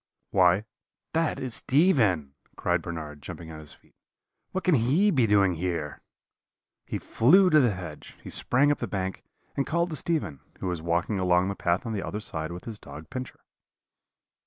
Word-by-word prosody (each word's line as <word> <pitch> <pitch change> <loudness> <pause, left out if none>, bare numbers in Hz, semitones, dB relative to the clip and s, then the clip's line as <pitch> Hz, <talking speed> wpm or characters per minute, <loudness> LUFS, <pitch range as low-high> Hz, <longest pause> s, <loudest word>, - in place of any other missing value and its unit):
"'Why, 95 +2 +4 0.5
that 165 0 +1
is 130 -3 -4
Stephen,' 110 - +2 0.2
cried - - 0
Bernard, 75 -3 -6
jumping 80 +3 -8
on 80 - -8
his 75 -2 -12
feet; - - -25 0.6
'what 190 - -2
can 180 - +3
he 145 - +3
be 130 -8 +3
doing 100 -3 +4
here?' 85 -3 -3 0.9
"He - - -2
flew 180 +10 +4
to 155 - +7
the 120 -8 +3
hedge, 85 -4 -9
he - - -8
sprang 140 +4 +2
up 145 - -1
the 120 - -3
bank, 95 -1 -3 0.3
and 140 - -1
called 170 +2 0
to - - -2
Stephen, 150 - -2 0.2
who - - -5
was 90 -3 -2
walking 85 +4 0
along 90 0 +3
the 100 - -3
path 85 +3 0
on 115 - -3
the 100 - -2
other 105 - -4
side 80 -5 -2
with 90 +1 -8
his 110 -3 -7
dog 80 +2 -11
Pincher. 130 -1 -6
100 Hz, 180 wpm, -27 LUFS, 85-135 Hz, 0.9 s, to